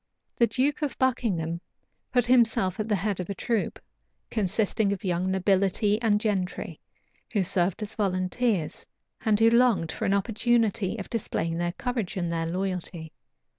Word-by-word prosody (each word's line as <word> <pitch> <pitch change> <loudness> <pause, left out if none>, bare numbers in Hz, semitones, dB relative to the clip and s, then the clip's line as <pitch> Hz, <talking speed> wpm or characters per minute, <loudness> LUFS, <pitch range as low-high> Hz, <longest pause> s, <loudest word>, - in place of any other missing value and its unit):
The 235 - +4
duke 275 +5 0
of 290 -5 -2
Buckingham 190 -11 0 0.5
put 245 -2 +3
himself 225 -7 +3
at 215 +1 -2
the 210 - +3
head 195 0 -1
of 180 - -4
a 200 - -3
troop, 225 -5 -1 0.5
consisting 210 0 +1
of 200 - -3
young 180 0 0
nobility 195 +2 +2
and 210 -3 +3
gentry, 195 -4 -2 0.5
who 205 -4 +2
served 185 +2 0
as 210 +1 -5
volunteers, 190 -1 -1 0.4
and 215 -2 +3
who 225 0 +5
longed 235 -9 +3
for - - -3
an 195 - +2
opportunity 220 -1 +1
of 200 - -6
displaying 170 -7 -2
their 175 0 -1
courage 235 -4 -3
and 175 -2 -1
their 165 0 -1
loyalty. 180 -2 -4
200 Hz, 155 wpm, -27 LUFS, 180-230 Hz, 0.5 s, who